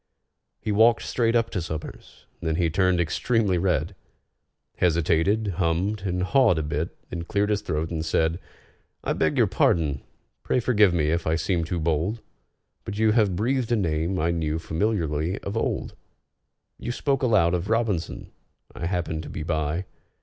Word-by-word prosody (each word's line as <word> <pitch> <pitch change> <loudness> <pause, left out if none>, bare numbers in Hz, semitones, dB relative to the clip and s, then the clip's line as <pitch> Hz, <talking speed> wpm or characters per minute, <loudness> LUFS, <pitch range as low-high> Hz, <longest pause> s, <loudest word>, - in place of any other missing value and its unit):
He 110 - -3
walked 115 +3 +4
straight 115 -1 +1
up 115 -1 +2
to 95 - -2
SOMERS, 80 -1 -8 0.2
then 80 -1 -1
he 85 -1 +1
turned 90 0 +2
extremely 95 +3 +1
red, 90 -1 0 0.8
Hesitated, 85 +5 +2
hummed 90 +4 0
and 90 0 -1
hawed 120 -3 +4
a 80 - 0
bit, 75 +3 -3
then 85 - -3
cleared 105 +3 0
his 105 -1 +1
throat, 80 -5 -2
and 80 -2 -2
said: 80 +1 +1 0.6
"I - - 0
beg - - 0
your - - +5
pardon—pray 75 - -1
forgive 105 -5 +4
me 75 -3 +1
if 85 0 -1
I 80 - +2
seem 85 0 0
too 85 +1 -2
bold, 85 +7 0 0.6
But 105 - -6
you 110 0 +3
have 105 -5 +2
breathed 120 +4 0
a - - +4
name 85 -2 0
I 85 0 +1
knew 80 -2 -1
familiarly 85 -1 -1
of 100 - -5
old. 115 - -2 0.9
You - - -3
spoke 135 +2 0
aloud 105 -9 +3
of 90 +2 -2
ROBINSON—I 105 -7 -3
happened 85 -3 -2
to 75 - -9
be 85 -1 -5
by. 80 +2 -1
90 Hz, 160 wpm, -25 LUFS, 80-105 Hz, 0.9 s, your